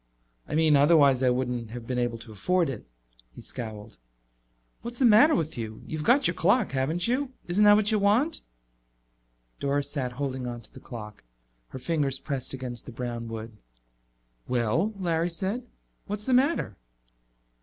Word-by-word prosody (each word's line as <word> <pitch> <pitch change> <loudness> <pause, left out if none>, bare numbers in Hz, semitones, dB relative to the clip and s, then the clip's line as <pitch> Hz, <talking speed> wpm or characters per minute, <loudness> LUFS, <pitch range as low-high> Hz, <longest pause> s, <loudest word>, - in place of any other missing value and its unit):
"I - - -3
mean, 155 -1 +4
otherwise 140 -3 +5
I 130 - +4
wouldn't 125 -2 -1
have 120 0 -8
been 125 +1 -2
able 120 -1 -1
to 115 0 -12
afford 165 - +1
it." 120 - -9 0.4
He - - -14
scowled. 110 - -8 0.8
"What's 235 +1 -7
the 260 - +3
matter 235 +8 +7
with 160 -6 -2
you? 110 -1 -6
You've 155 -1 -4
got 260 - +4
your - - +3
clock, 200 +7 +2
haven't 145 +8 0
you? 260 +2 -1
Isn't 195 +4 +3
that 205 0 +8
what 210 0 +3
you 215 - +2
want?" 225 +11 +2 1.2
Doris 140 0 -1
sat 130 -4 -3
holding 130 -1 -3
onto 120 -1 -7
the - - -12
clock, 105 -4 -9 0.4
her - - -8
fingers 140 -1 -1
pressed 135 -2 -4
against 125 -3 -5
the - - -6
brown 120 -1 -5
wood. 115 0 -7 0.9
"Well," 125 - +1
Larry 170 -2 0
said, 195 +9 -3 0.4
"what's 210 +1 -4
the 260 - +1
matter?" 260 - +2
140 Hz, 165 wpm, -27 LUFS, 120-200 Hz, 1.2 s, that